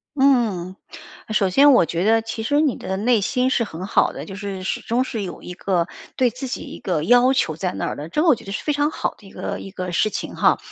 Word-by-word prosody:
嗯， 230 -10 +2 0.5
首 210 -3 +2
先 280 +9 +6
我 245 - +5
觉 170 +2 -2
得 225 +1 +4
其 225 0 -5
实 290 +6 +2
你 285 -7 +2
的 190 - -4
内 225 +1 +2
心 250 +6 +1
是 245 - +2
很 185 -4 -6
好 - - +2
的， - - -7
就 195 - -8
是 200 -2 -5
始 - - -2
终 245 +3 0
是 225 -4 -4
有 185 - -6
一 180 - -7
个 180 -2 0 0.3
对 255 -1 +4
自 255 +2 -6
己 250 - -4
一 - - -9
个 160 -5 -1
要 245 +5 +5
求 160 - +1
在 180 +2 -2
那 - - -3
儿 - - -3
的， 150 +3 -7
这 300 - 0
个 345 - +2
我 300 - +6
觉 - - -14
得 195 - -8
是 200 - -4
非 300 - 0
常 290 +1 +1
好 - - -2
的 200 - -16
一 - - -14
个 - - -5
一 195 - -9
个 185 -2 -5
事 215 +5 +2
情 - - -5
哈。 - - +3
215 Hz, 290 characters per minute, -22 LUFS, 185-255 Hz, 0.5 s, 先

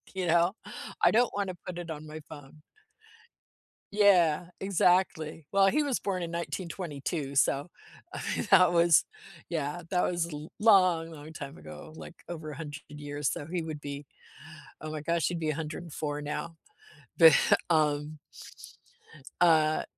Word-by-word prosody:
You 185 -1 -1
know? 170 +4 +3 0.5
"I - - +7
don't 240 +2 +3
want 200 -1 -1
to 185 - -5
put 180 -1 -5
it 170 -1 -6
on 155 0 -7
my 155 +1 -8
phone." 150 0 -12 1.3
Yeah, 180 -5 +4
exactly. 180 -4 +1
Well, 195 0 +5
he 300 +10 +3
was 280 -4 -1
born 185 -2 -2
in 170 - -4
1922, 170 -4 -4
so, 140 +3 +2 0.4
I - - -5
mean, 220 - -3
that 180 -2 +7
was, 170 -2 +5 0.5
yeah, 160 +1 -3
that 180 -1 +2
was 170 -1 -1
l 150 +2 -7
long, 185 -7 +4
long 155 0 -11
time 145 +1 -8
ago, - - -11
like 160 - -10
over 160 -3 -6
100 145 0 -7
years, 145 -1 -4
so - - -4
he 175 +2 -2
would 155 -2 -6
be, 145 0 -6 0.8
oh, 155 - -5
my 155 -1 -5
gosh, 165 0 0
he'd 175 -1 -2
be 155 -2 0
104 155 -1 -5
now. 150 +3 -4 0.6
But, 165 -2 +9 0.4
um 150 -1 +1 1.2
uh, 155 -3 +4
165 Hz, 150 wpm, -29 LUFS, 150-180 Hz, 1.3 s, But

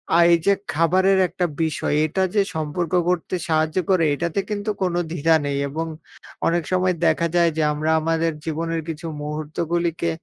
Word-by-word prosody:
আ - - +6
এই 170 - +6
যে 200 - +5 0.2
খাবারের 185 +4 +3
একটা 180 +1 -2 0.2
বিষয় 160 -2 -1
এটা 190 +5 0
যে 205 - +5
সম্পর্ক 155 +2 -2 0.2
গড়তে 180 0 0
সাহায্য 155 +1 +1
করে 185 -3 +3
এটাতে 170 +5 -2
কিন্তু 205 0 -3
কোনো 175 -1 0
দ্বিধা 165 -1 +3
নেই। 140 -1 -1
এবং 160 +3 -3 0.6
অনেক 170 0 +1
সময় 185 0 +2
দেখা 165 +1 +2
যায় 170 -1 +4
যে 160 - +2
আমরা 155 +2 -1
আমাদের 165 +1 +1
জীবনের 165 +1 -2
কিছু 160 +1 -6 0.2
মুহূর্তগুলিকে 165 +3 -2
165 Hz, 165 wpm, -22 LUFS, 155-175 Hz, 0.6 s, আ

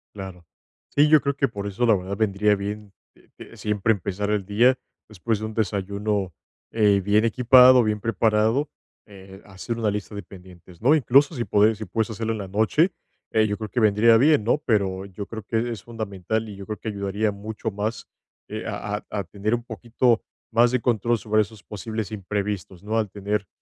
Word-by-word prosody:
Claro. 95 -3 -9 0.4
Sí, 145 +1 +3
yo 155 -1 +6
creo 140 0 -1
que 140 -1 +1
por 100 -4 -7
eso, 100 +4 -1
la 110 - +5
verdad, 95 +1 -4
vendría 105 0 +2
bien, 100 0 -6 0.5
eh, - - -12
siempre 105 +1 +1
empezar 100 +1 -3
el 105 -2 0
día 120 +6 +3 0.3
después 110 +1 -2
de 110 - -4
un 110 - -6
desayuno, 100 -2 -2 0.4
eh, 105 -3 +3
bien 105 +3 +3
equipado, 125 +2 +6
bien 105 -1 -1
preparado, 115 +5 +1 0.4
eh, 95 -1 -13
hacer 105 +4 -6
una 110 -2 0
lista 105 +1 -4
de 100 - -5
pendientes, 90 -3 -15
¿no? 135 +5 +5
Incluso 145 +1 +4
si 120 -5 -3
puedes 105 +1 +3
si 110 - -5
puedes 110 +1 -2
hacerla 115 +1 -2
en - - -4
la 100 -2 -6
noche, 110 - +2 0.4
eh, 110 -1 +3
yo 105 0 -2
creo 110 -1 -6
que 120 - -1
vendría 110 +1 +5
bien, 145 -1 +4
¿no? 120 +7 +2
Pero 95 -5 0
yo 100 +1 -7
creo 110 +2 -7
que 115 +3 -1
es 110 -5 -6
fundamental 110 -1 -4
y 105 - -8
yo 100 - -9
creo 105 -1 -4
que 110 - -5
ayudaría 100 +1 -1
mucho 110 +2 -5
más, 105 +3 -4 0.4
eh, - - -5
a 105 0 -3
a - - -11
a 100 - -3
tener 100 +5 -2
un 120 - -6
poquito 120 0 0 0.3
más 120 +1 +4
de 125 +1 0
control 115 0 +1
sobre 110 0 +1
esos 105 0 -7
posibles 110 0 -5
imprevistos, 100 -2 -4
¿no? 110 +2 0
Al 110 -2 -1
tener 100 0 -3
105 Hz, 200 wpm, -24 LUFS, 100-115 Hz, 0.5 s, yo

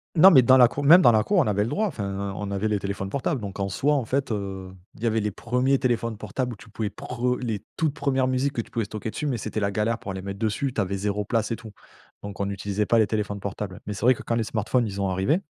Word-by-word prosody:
Non, 185 +4 +9
mais 130 -5 +8
dans 130 +2 +6
la 125 -2 +8
cour 145 +4 -5
même 170 +6 +8
dans 120 - +8
la 110 -1 +3
cour, 205 - +1
on 165 - +4
avait 105 -1 +1
le 115 - -2
droit. 215 - 0
Enfin, 100 - -3
on 105 -1 -4
avait 100 +2 -1
les 105 -1 0
téléphones 100 0 -4
portables, 140 0 -1
donc 100 -1 -7
en 100 - -1
soi, 145 +8 +1
en 135 -5 0
fait, 135 +1 -1
heu, 95 -2 -4 0.3
il 110 - -11
y - - +1
avait 110 -1 +2
les 105 0 -1
premiers 125 +6 0
téléphones 115 -4 -1
portables 120 +4 -3
où - - -9
tu 115 - -16
pouvais 105 0 -3
prem 125 +4 -2
les 110 -4 -3
toutes 155 -3 +1
premières 135 -4 0
musiques 130 +2 0
que 115 - -1
tu - - -15
pouvais 115 -3 -1
stocker 110 +1 -5
dessus, 150 - -3
mais 125 -4 -1
c'était 110 0 -4
la 100 - 0
galère 110 +3 -1
pour 95 - -6
les 95 0 -6
mettre 100 0 -6
dessus. 115 +4 -1
Tu 110 - 0
avais 100 +1 -2
0 105 +1 -2
place 115 0 -1
et 115 - +1
tout. 110 -2 -11 0.5
Donc, 100 -1 -7
on 100 0 -1
utilisait 100 +1 -2
pas 115 - +3
les 110 - +5
téléphones 105 -1 -2
portables. 100 -1 -5
Mais 105 - -4
c'est 100 - -8
vrai 125 +2 +6
que, - - -10
quand 115 - -1
les 115 - +1
smartphones, 110 +2 0
ils 100 0 -6
ont 95 -1 0
arrivés 95 - +1
110 Hz, 295 wpm, -25 LUFS, 100-125 Hz, 0.5 s, Non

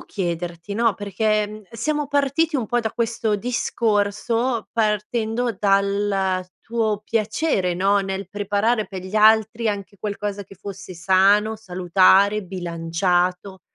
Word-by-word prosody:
chiederti 175 0 -4
no, 230 0 +2
perché, 210 +1 0
mhmm, 210 - -9
uhm, 215 - -13
siamo 295 +6 -2
partiti 285 +3 +1
un 245 -5 -2
po' 240 +3 +1
da 220 -1 -2
questo 230 -2 -1
discorso, 230 +1 0
partendo 225 +1 -1
dal 200 -1 +1 0.2
tuo 225 -3 -1
piacere, 215 - 0
no, 195 +3 +2
nel 195 -1 -4
preparare 205 +3 0
per 190 -2 -7
gli 190 +2 -8
altri 220 +1 +4
anche 200 -1 -4
qualcosa 205 -1 -4
che 195 0 -15
fosse 195 0 -9
sano, 195 +5 +3
salutare, 195 +1 +3
bilanciato, 180 +1 -1
205 Hz, 125 wpm, -22 LUFS, 190-225 Hz, 0.2 s, altri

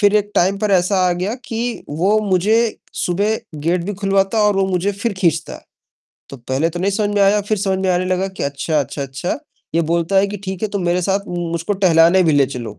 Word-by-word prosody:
फिर 205 -1 +4
एक 205 0 0
टाइम 190 +3 +2
पर 210 0 -1
ऐसा 185 +1 +2
आ - - +2
गया 185 +5 -2
कि 235 +1 -4
वो 185 +9 +1
मुझे 190 +5 +3 0.4
सुबह 205 +5 0 0.3
गेट 175 +1 +1
भी 205 +2 -3
खुलवाता 195 +2 +1
और 205 -1 +3
वो 195 - +2
मुझे 190 +2 0
फिर 215 +3 -2
खींचता 170 -4 0
है। - - -13 0.7
तो 140 - -8
पहले 130 +6 -1
तो 175 +1 -5
नहीं 195 +2 +1
समझ 205 0 0
में 205 - +2
आया, 200 +1 +4
फिर 210 +1 -2
समझ 190 -1 0
में 190 0 -1
आने 180 0 +1
लगा 185 +1 0
कि 190 - -7
अच्छा, 145 +2 -1
अच्छा, 140 +1 -4
अच्छा 135 - -4 0.4
ये 170 - +3
बोलता 170 +3 +1
है 195 +1 +5
कि 205 - -5
ठीक 190 0 -5
है, 215 - 0
तू 200 0 -3
मेरे 175 0 0
साथ 195 +3 +1
उम, 175 0 -3
मुझको 170 +4 -2
टहलाने 180 -1 +4
भी 165 -3 +3
ले 140 -2 +4
चलो। 120 -5 -7
190 Hz, 240 wpm, -18 LUFS, 170-200 Hz, 0.7 s, है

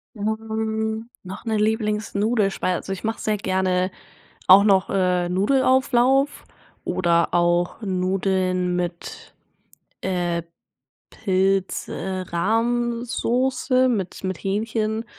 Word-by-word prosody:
Hm, 220 +1 -3
noch 185 +1 -8
'ne 220 -1 0
Lieblings-Nudelspeise, 210 -2 0
also, 195 - -5
ich 190 - -8
mache 225 +1 -2
sehr 215 -1 -1
gerne 185 -1 0 0.6
auch 195 +2 +9
noch, 195 -3 +3
äh, 180 -2 +1
Nudelauflauf 260 +5 +2 0.4
oder 170 -2 +1
auch 175 +2 +1
Nudeln 185 -1 0
mit, 175 -1 -5 0.7
äh, 175 -2 -1 0.7
Pilz, 190 -1 0
äh, 190 -1 -4
Rahmsoße, 240 +5 0
mit 195 -5 -3
mit 185 -2 -2
Hähnchen 220 +2 -2
200 Hz, 95 wpm, -23 LUFS, 185-225 Hz, 0.7 s, auch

